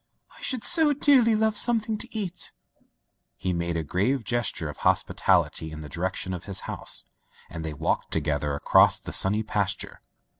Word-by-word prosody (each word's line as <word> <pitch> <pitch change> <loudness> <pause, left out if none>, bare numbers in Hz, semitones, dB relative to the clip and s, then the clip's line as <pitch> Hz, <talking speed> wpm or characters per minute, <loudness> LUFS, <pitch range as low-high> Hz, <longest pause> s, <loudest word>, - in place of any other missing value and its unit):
" - - -21
I - - -16
should 255 -4 0
so 320 -4 +4
dearly 260 -5 +4
love 220 0 +1
something 225 -2 +2
to 240 - -10
eat.'* 185 -4 -5 0.8
He 95 -1 -2
made 85 -1 -2
a 80 - -2
grave 105 - 0
gesture 110 -7 -2
of 75 - -8
hospitality 80 - +1
in 80 0 -8
the 75 - -9
direction 95 +1 -3
of 90 -1 -7
his 100 -1 -4
house, - - -5 0.5
and 80 - -6
they 80 -2 -5
walked - - -1
together 75 -2 -1
across 70 - +4
the - - -7
sunny 105 +3 +5
pasture. 105 -3 -3
100 Hz, 175 wpm, -26 LUFS, -, 0.8 s, sunny